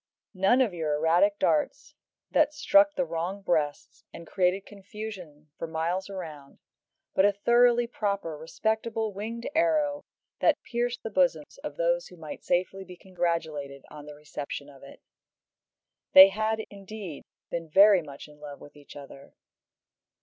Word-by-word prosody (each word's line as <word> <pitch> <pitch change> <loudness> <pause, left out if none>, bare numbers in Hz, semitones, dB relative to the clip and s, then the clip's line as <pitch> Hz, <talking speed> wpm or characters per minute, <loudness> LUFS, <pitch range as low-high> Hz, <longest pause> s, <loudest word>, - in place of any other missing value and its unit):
None 195 +7 +3
of 230 -7 +1
your 155 -3 -1
erratic 170 +7 +3
darts 285 - 0 0.4
that 300 0 +2
struck 295 +1 +4
the 270 - 0
wrong 180 +2 -4
breasts, 155 -5 -2
and 170 - -10
created 185 +3 0
confusion 195 -7 -10
for 165 - -4
miles 170 +4 -2
round, 155 -8 -9 0.6
but 190 - +3
a 205 - +5
thoroughly 240 +4 +3
proper, 200 -8 -3
respectable 220 +7 -2
winged 225 +4 -6
arrow 305 -3 +1 0.4
that - - +2
pierced 240 0 -3
the 225 - -5
bosoms 280 - 0
of - - -7
those - - 0
who 180 - -15
might 155 -2 -9
safely 185 +2 -1
be 180 -1 -12
congratulated 160 -7 -3
on 150 -1 -11
the 150 - -10
reception 145 -1 -7
of 135 - -17
it. 140 - -14 1.1
They 190 +1 +11
had, 220 +2 -1
indeed, 200 -5 -9 0.3
been 165 -1 -4
very 195 +2 +6
much 145 -2 -11
in 150 0 -18
love 145 -1 -9
with 145 - -14
each 145 -1 -15
other. 140 -1 -13
190 Hz, 150 wpm, -27 LUFS, 160-225 Hz, 1.1 s, They